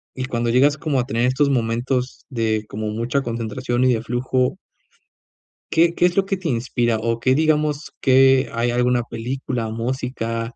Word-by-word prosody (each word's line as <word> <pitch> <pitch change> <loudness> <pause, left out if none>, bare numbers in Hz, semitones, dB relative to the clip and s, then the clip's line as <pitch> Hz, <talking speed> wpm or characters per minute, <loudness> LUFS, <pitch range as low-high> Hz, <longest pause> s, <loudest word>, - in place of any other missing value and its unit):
y 130 - -3
cuando 120 -2 -2
llegas 140 +4 +4
como 145 -5 -1
a 125 - 0
tener 120 -2 0
estos 135 +3 +2
momentos 125 +1 -1
de 110 -4 -1
como 110 +1 -4
mucha 120 +6 -1
concentración 120 +1 -2
y 130 - +4
de 110 - -1
flujo. 125 +4 -1 1.1
¿Qué 170 +1 +4
qué 175 - +2
es 175 - -4
lo 195 - +3
que 195 - -1
te 175 -4 -4
inspira? 120 -1 0
O 115 +1 -1
que 130 +2 +2
digamos 150 -1 0
que 135 0 +5
hay 120 +1 0
alguna 125 0 +1
película, 120 +1 -4
o - - -5
música, 115 -1 -3
125 Hz, 175 wpm, -21 LUFS, 115-135 Hz, 1.1 s, que